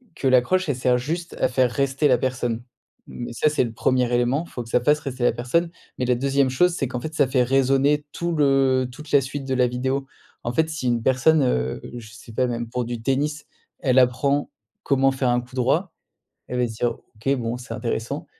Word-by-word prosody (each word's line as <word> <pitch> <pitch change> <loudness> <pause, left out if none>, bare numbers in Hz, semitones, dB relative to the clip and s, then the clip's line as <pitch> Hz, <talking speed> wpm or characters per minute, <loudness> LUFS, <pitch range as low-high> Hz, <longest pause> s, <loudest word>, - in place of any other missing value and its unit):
que 135 - -1
l'accroche, 130 +9 +3
elle 145 - +1
sert 125 0 +2
juste 165 +7 -4
à - - +3
faire 125 -1 +2
rester 140 +2 +1
la 125 -2 +4
personne. 120 -2 -2 0.4
Mais 120 - -7
ça, 155 - +1
c'est 150 - +1
le 120 - -4
1er 125 +1 +1
élément, 120 +6 +1
il - - -18
faut 120 - -5
que 115 - -14
ça 125 - +2
fasse 150 +4 +3
rester 130 -4 -5
la - - +4
personne. 165 +8 0 0.3
Mais 125 - 0
la 125 - +2
2e 135 +1 +1
chose, 175 +7 +3
c'est 135 -6 -1
qu'en 125 0 -4
fait, 155 +5 -6
ça 145 -3 +3
fait 125 -1 +2
résonner 135 +3 +2
tout 170 0 -2
le 135 -3 +3
toute 150 +4 -11
la 140 -1 +5
suite 135 +1 -5
de 130 - -2
la 125 -1 +3
vidéo. 130 +2 -2 0.4
En 120 - -2
fait, 160 +4 +2
si 155 -6 -3
une 120 -1 +1
personne, 135 +4 +3
heu, 65 - 0 0.2
je 110 -2 -10
sais 115 0 -13
pas, 125 +2 +1
même 120 -1 -3
pour 125 0 -2
du 120 -1 -5
tennis, 150 +4 -1 0.3
elle 130 -1 +3
apprend 135 +3 +2 0.3
comment 135 -1 +3
faire 130 -2 0
un 120 0 +2
coup 125 +2 -14
droit, 140 +9 +1 0.5
elle 125 - -4
va 120 - +2
se 110 - -8
dire: 120 +2 0 0.2
«OK, 135 +6 0
bon, 120 -1 -3
c'est 125 +2 -8
intéressant». 120 +4 -3
130 Hz, 230 wpm, -23 LUFS, 125-140 Hz, 0.5 s, la